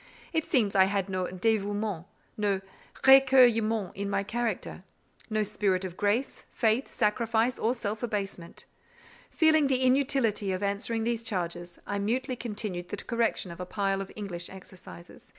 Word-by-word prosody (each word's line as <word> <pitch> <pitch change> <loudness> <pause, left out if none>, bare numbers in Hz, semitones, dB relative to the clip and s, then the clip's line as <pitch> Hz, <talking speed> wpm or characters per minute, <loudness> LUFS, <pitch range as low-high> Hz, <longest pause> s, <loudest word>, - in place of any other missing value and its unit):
It 320 -1 +1
seems 215 -7 +2
I 190 -1 +6
had 195 0 -1
no 185 -1 -1
"dévouement," 205 -1 -1 0.3
no 200 -2 0 0.4
"récueillement" 240 -6 +5
in 200 +1 -4
my 200 - 0
character; 220 -3 -3 0.5
no 215 -1 +1
spirit 195 -2 0
of 180 -2 -6
grace, 210 +8 -1
faith, 230 +3 +1
sacrifice, 225 +2 0
or 235 +3 +1
self 215 -3 -4
abasement. 200 -6 -4 0.6
Feeling 315 -2 +4
the 260 -1 +1
inutility 255 -6 +2
of 185 +2 -3
answering 200 +3 -1
these 235 0 -1
charges, 175 -4 -4
I 200 0 -2
mutely 250 +5 -1
continued 205 -7 -5
the 205 - -4
correction 230 -5 -1
of 170 - -10
a 180 - -4
pile 195 -1 -1
of 195 - -7
English 180 -5 -5
exercises. 185 -2 -13
210 Hz, 150 wpm, -28 LUFS, 195-235 Hz, 0.6 s, I